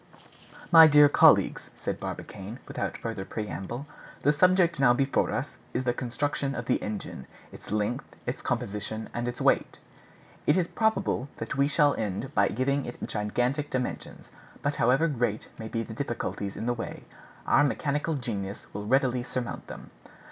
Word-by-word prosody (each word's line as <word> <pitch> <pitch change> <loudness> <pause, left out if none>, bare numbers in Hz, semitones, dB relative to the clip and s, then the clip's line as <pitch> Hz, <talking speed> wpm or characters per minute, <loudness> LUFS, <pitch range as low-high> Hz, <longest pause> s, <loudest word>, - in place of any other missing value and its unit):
"My 165 -2 +10
dear 150 -1 +8
colleagues," 145 - +5
said - - -4
Barbicane, 100 +5 -6
without - - -3
further 115 -4 -4
preamble, 110 +5 -5 0.4
"the 145 - +4
subject 175 0 +4
now 130 -3 +6
before 135 +2 +1
us - - -3 0.2
is 130 - 0
the 120 -1 +1
construction 135 +3 -2
of 120 - -4
the 125 - +1
engine, 105 -10 -5 0.2
its - - -12
length, 105 +3 -2
its - - -3
composition, 105 +2 -3
and 120 0 -2
its 120 - -4
weight. - - +2 0.7
It 150 - +5
is 175 -2 +2
probable 220 - 0
that - - -4
we 140 +1 +3
shall 145 -1 +3
end 110 +6 -3
by 100 0 +4
giving 140 +3 0
it 120 - -7
gigantic 125 +7 -1
dimensions; 125 -1 -4 0.3
but 145 0 0
however 130 +7 +3
great 120 -7 -1
may 110 - -5
be 115 0 -2
the 110 - -8
difficulties 110 -5 -3
in - - -4
the 120 - +1
way, 115 - -6 0.4
our 145 - +5
mechanical 145 +2 0
genius 100 -7 -4
will 105 +1 -5
readily 130 0 +2
surmount 125 -1 -5
them. - - -10
125 Hz, 160 wpm, -28 LUFS, 110-145 Hz, 0.7 s, My